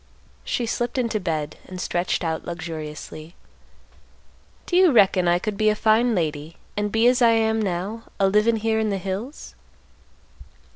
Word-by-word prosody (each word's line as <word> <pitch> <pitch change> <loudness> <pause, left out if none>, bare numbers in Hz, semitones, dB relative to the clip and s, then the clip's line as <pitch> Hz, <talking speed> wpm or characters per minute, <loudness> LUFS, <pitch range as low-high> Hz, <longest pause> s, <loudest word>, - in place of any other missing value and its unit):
She 240 - -2
slipped 240 +2 -2
into 230 -4 0
bed 155 -5 -3
and 185 -1 -8
stretched 180 0 -1
out 160 -1 -2
luxuriously. 160 -1 -7 1.3
"Do 350 - -2
you 365 -2 +6
reckon 190 -6 +4
I 175 0 +4
could 205 +2 -4
be 215 0 +3
a 210 - +1
fine 225 +2 +3
lady, 155 -2 -3 0.2
and 210 0 -1
be 225 +2 +2
as 250 +1 +4
I 230 -1 +6
am 220 0 +1
now, 200 +4 -3
a 195 - +4
livin' 210 +4 +3
here 220 0 0
in 220 -1 0
the 200 - -1
hills?" 195 - -6
205 Hz, 160 wpm, -23 LUFS, 175-225 Hz, 1.3 s, you